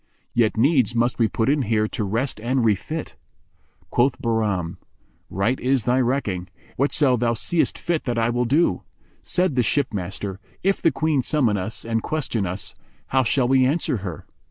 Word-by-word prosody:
Yet 115 -2 +2
needs 125 -2 +3
must 120 +1 +1
we 115 - +4
put 115 +1 -1
in 145 +1 +3
here 110 -3 +1
to 110 - -3
rest 115 +6 -1
and 125 +1 +1
refit." 110 - -1 0.8
Quoth 120 0 +2
Bahram, 105 -7 -1 0.5
"Right 100 +8 0
is 130 -2 +1
thy 125 +1 +3
recking, 115 -8 -1
and - - -31 0.2
whatso 140 -1 +2
thou 120 0 +1
seest 165 +8 0
fit 170 -2 -2
that 120 -2 0
will 120 - 0
I - - +1
do!" 140 - +2 0.4
Said 180 -2 +1
the 125 - +3
ship 130 +1 0
master, 95 0 -4 0.2
"If 195 +1 +1
the - - +4
Queen 155 -1 +1
summon 125 -6 +2
us 100 +4 -3
and 115 -1 0
question 125 -10 -2
us, 90 +3 -5 0.4
how 130 0 +3
shall 125 +1 +1
we 130 0 +4
answer 135 -1 +1
her?" 95 -5 -7
120 Hz, 180 wpm, -23 LUFS, 110-135 Hz, 0.8 s, we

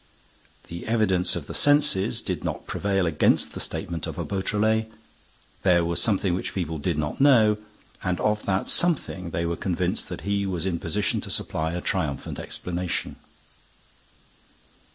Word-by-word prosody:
The 85 +4 -8
evidence 95 -6 +1
of 85 -5 -5
the - - -8
senses 145 -10 +4
did - - -3
not - - -4
prevail 95 -2 0
against 80 -3 +2
the - - -6
statement 85 -2 -3
of - - -6
a - - -3
Beautrelet. 110 +3 0 0.7
There 85 -3 +3
was 85 0 0
something 100 -3 +2
which 90 - -3
people 80 -4 -3
did 80 +2 -1
not 75 - -3
know, 115 -7 +5 0.5
and 90 -1 -1
of 105 0 0
that 95 -1 0
something 140 - +3
they 85 +1 -2
were 85 0 -1
convinced 90 +2 -2
that - - -6
he 100 0 -1
was 90 -2 -2
in 85 -3 -1
position 100 +5 -1
to - - -7
supply 80 +1 -2
a 90 - -3
triumphant 80 -9 -3
explanation. 90 -1 -3
95 Hz, 155 wpm, -25 LUFS, 85-105 Hz, 0.7 s, know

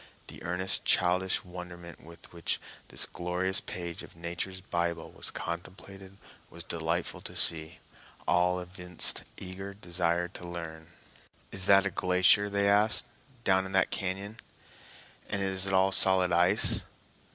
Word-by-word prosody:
The - - -11
earnest, 90 +2 0
childish 90 +1 +2
wonderment 90 -1 -10
with 85 +1 -15
which 85 -2 -3 0.3
this - - 0
glorious 90 +2 -2
page 85 -2 -6
of - - -13
Nature's 85 +3 -5
Bible 85 -2 -3
was - - -8
contemplated 95 +3 -8 0.3
was 85 0 -10
delightful 85 +1 -3
to - - -9
see. 80 -1 +3 0.5
All 90 +1 +2
evinced 90 -1 -1
eager 95 +1 -7
desire 85 -2 -1
to 90 -1 -10
learn. 80 -2 -8 0.6
"Is 95 -1 -1
that 100 0 +5
a 100 - -1
glacier," 90 +4 +3
they 100 0 +1
asked, 105 +3 +5 0.4
"down 95 -2 +2
in 95 - -9
that 95 - +2
cañon? 100 +3 -4 0.9
And 100 -1 -2
is 95 0 -1
it 95 - -2
all 95 +1 +3
solid 95 -2 +3
ice?" 90 +4 +7
90 Hz, 140 wpm, -29 LUFS, 85-95 Hz, 0.9 s, ice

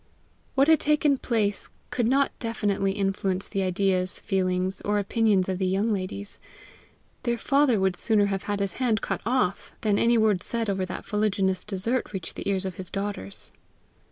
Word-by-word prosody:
What 275 +1 +4
had 320 -2 +6
taken 295 -2 +3
place 210 -4 0 0.2
could 240 -3 +1
not 275 +3 +3
definitely 205 -4 0
influence 195 -1 -1
the 195 - -2
ideas, 185 0 0
feelings, 185 0 0
or 205 0 0
opinions 205 -2 +2
of 190 -1 -2
the 190 - +1
young 200 +4 +1
ladies. 200 +1 -5 0.8
Their 240 -1 0
father 275 -2 +3
would 190 -1 +1
sooner 210 +2 +2
have 195 -1 -2
had 205 -1 -1
his 200 -1 0
hand 225 -5 +2
cut - - -2
off 240 -7 0
than 205 -2 +2
any 235 0 +4
word 215 -4 +3
said 230 -3 -1
over 190 -1 -2
that 185 - -6
fuliginous 195 -3 0
dessert 215 +5 -1
reach 185 -4 -4
the - - -4
ears 195 -1 0
of 185 -2 -5
his 185 -2 -5
daughters. 195 - -5
200 Hz, 175 wpm, -26 LUFS, 190-225 Hz, 0.8 s, had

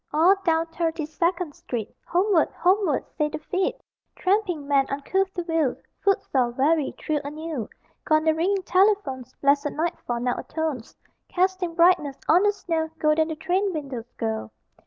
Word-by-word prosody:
All 325 +6 +5
down 325 -1 +2
Thirty 325 -1 -2
second 340 +1 -1
Street 230 -6 -5
Homeward, 360 -2 +3
Homeward, 370 -4 +2
say 300 0 +2
the 310 - -4
feet! 365 +5 -1 0.4
Tramping 370 -7 0
men, 275 -1 +3
uncouth 380 +8 0
to 350 - -2
view, 325 -6 0 0.2
Footsore, 270 -10 +1
weary, 285 +4 +1
thrill 300 -2 -1
anew; 300 -5 -5 0.3
Gone 310 0 +3
the 315 0 +3
ringing 375 +4 0
telephones, 370 - +1
Blessed 280 +1 +3
nightfall 310 -7 -2
now 245 0 -1
atones, 310 -7 -4 0.3
Casting 365 -2 0
brightness 335 -5 +4
on 345 +3 +6
the 415 0 +4
snow 330 -5 -2
Golden 310 0 +2
the 320 - -4
train 380 +4 0
windows 270 -6 -6
go. 110 -1 -2
320 Hz, 150 wpm, -25 LUFS, 285-360 Hz, 0.4 s, on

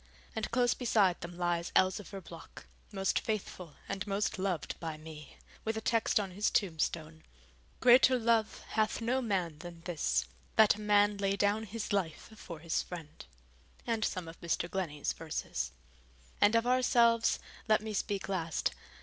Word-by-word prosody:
And 220 -1 -2
close 245 0 +3
beside 210 -7 +2
them 175 0 -7
lies 175 -1 -1
Elzevir 190 +1 +1
Block, 165 -1 -12 0.3
most 195 -2 +1
faithful 185 -7 -4
and 195 +1 -4
most 200 0 -1
loved 185 -4 -1
by 160 -2 -4
me, 155 -1 -11 0.3
with 220 0 -2
a - - 0
text 225 0 +2
on 195 -2 -3
his 205 +3 +1
tombstone: 160 -3 -1 0.6
'Greater 255 +1 +7
love 225 -2 +1
hath 215 -1 +1
no 245 +3 0
man 180 -9 -1
than 170 0 -9
this, 150 - 0 0.3
that 220 -1 +7
a 215 - -9
man 205 0 +4
lay 195 0 +1
down 205 +2 +1
his 215 0 -4
life 185 -1 -2
for 170 -5 -8
his 165 0 0
friend,' 165 -4 -9 0.6
and 230 -2 0
some 185 -5 -2
of 165 - -11
Mr. 170 0 -1
Glennie's 170 -6 -2
verses. 160 - -4 0.7
And 205 +2 +5
of 230 +1 +3
ourselves 235 -2 +4 0.3
let 215 -1 +4
me 215 0 -5
speak 200 -1 -2
last. 170 -5 -1
195 Hz, 160 wpm, -32 LUFS, 170-220 Hz, 0.7 s, Greater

